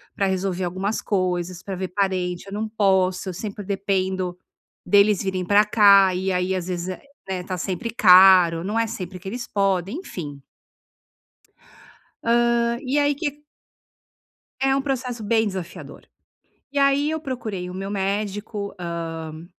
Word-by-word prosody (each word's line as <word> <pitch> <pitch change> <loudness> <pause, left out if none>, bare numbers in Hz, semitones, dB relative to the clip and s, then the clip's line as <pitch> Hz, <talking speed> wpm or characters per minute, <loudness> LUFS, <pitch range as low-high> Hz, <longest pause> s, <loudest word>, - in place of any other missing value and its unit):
pra 195 - +1
resolver 190 -1 -1
algumas 190 +4 -2
coisas, 180 -2 -2
pra 195 -2 -5
ver 185 0 -4
parente, 185 -2 -1
eu 195 - -8
não 215 +1 -2
posso. 190 -3 +1
Eu - - -4
sempre 205 +2 -6
dependo 190 -2 -1 0.5
deles 205 -1 +4
virem 185 -2 -2
para 205 +2 +5
cá 200 -3 +6
e 190 +1 -1
aí 180 +1 0
às 180 -1 -4
vezes 180 0 -3
é, 185 - -6 0.3
né, 185 -1 -3
tá 185 0 -4
sempre 185 +5 -3
caro, 185 -5 +7
não 215 +4 -1
é 230 - +1
sempre 185 -3 -6
que 190 - -11
eles 240 +4 -4
podem, 195 - 0
enfim 145 - -8 1.8
hã, 235 0 +2
e 270 +3 0
aí 290 0 +2
que 295 -1 -4 1.2
É 270 0 +3
um 275 - 0
processo 250 -4 -3
bem 220 +1 +2
desafiador. 190 -3 -7 0.7
E 285 - -1
aí 280 +2 +3
eu 315 -1 -2
procurei 215 - -5
o - - -8
meu 195 +1 -5
médico, 205 +1 -3
hã, 165 -2 -6
195 Hz, 155 wpm, -23 LUFS, 180-220 Hz, 1.8 s, caro